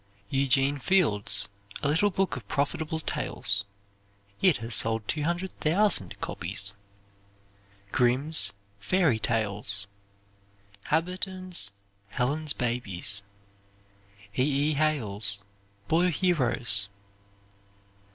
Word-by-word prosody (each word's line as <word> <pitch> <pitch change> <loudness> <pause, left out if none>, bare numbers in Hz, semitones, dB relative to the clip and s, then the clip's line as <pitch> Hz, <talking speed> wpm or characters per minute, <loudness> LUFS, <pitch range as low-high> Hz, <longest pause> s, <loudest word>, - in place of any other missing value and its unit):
Eugene 135 +1 +2
Field's 110 - +3 0.4
"A - - +2
Little 165 +8 +3
Book 190 0 -1
of - - -9
Profitable 155 +2 -1
Tales." 100 -9 +1 0.8
It 185 -5 +5
has 115 +1 -6
sold 110 -1 +3
200,000 170 - 0
copies. - - -5 1.2
Grimm's 130 +6 +3 0.3
"Fairy 165 - +2
Tales." 105 -3 -1 1.0
Habberton's 180 - -2 0.4
"Helen's 145 +7 -1
Babies." 100 -5 -1 1.1
E. - - +1
E. 145 +2 +2
Hale's 110 -10 -1 0.5
"Boy 175 +3 +3
Heroes." 125 - +2
140 Hz, 80 wpm, -27 LUFS, 110-165 Hz, 1.2 s, It